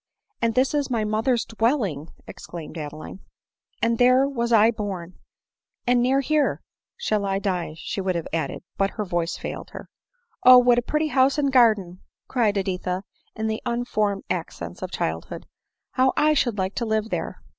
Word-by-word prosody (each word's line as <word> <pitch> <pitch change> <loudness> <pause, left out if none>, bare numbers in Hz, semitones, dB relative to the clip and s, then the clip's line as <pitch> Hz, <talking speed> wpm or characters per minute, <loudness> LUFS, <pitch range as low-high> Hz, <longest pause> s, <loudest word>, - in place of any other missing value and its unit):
— - - -60
" - - -48
And 230 -1 +1
this 260 +2 +2
is 290 -2 0
my 230 -3 0
mother's 225 +3 0
dwell 230 +4 +1
ing 155 -4 -5
!" - - -27
exclaimed 170 -2 -9
Adeline; 155 +3 -7 0.3
" - - -46
and 230 0 +2
there 255 +2 +5
was 235 -4 -2
I 225 0 +6
born; 190 -5 -6 0.7
and 245 0 +3
near 265 +3 +3
here 300 +1 +1
— - - -67
" - - -68
shall 210 -1 +1
I 195 -1 0
die, 180 -5 -2
she 195 - -4
would 185 -1 -1
have 170 - -3
added 160 -4 -2
but 195 0 +2
her 210 - -1
voice 175 -2 -2
failed - - -6
her. - - -9 0.5
"Oh! 255 0 +10
what 245 -1 +5
a - - -1
pretty 305 +5 -1
house 270 0 +3
and 280 -2 +1
garden!" 210 -8 +3 0.3
cried 220 -5 +1
Edi 190 -1 -1
tha 185 +1 -3 0.3
in 220 - -3
the 220 0 -2
unformed 215 -5 -1
accents 85 - -5
of - - -4
childhood; 80 0 -4 0.2
— - - -59
" - - -61
how 260 0 +2
I 305 +1 +4
should 240 -7 +1
like 190 0 -1
to 235 - 0
live 220 0 -1
there - - -4
220 Hz, 205 wpm, -24 LUFS, 185-250 Hz, 0.7 s, Oh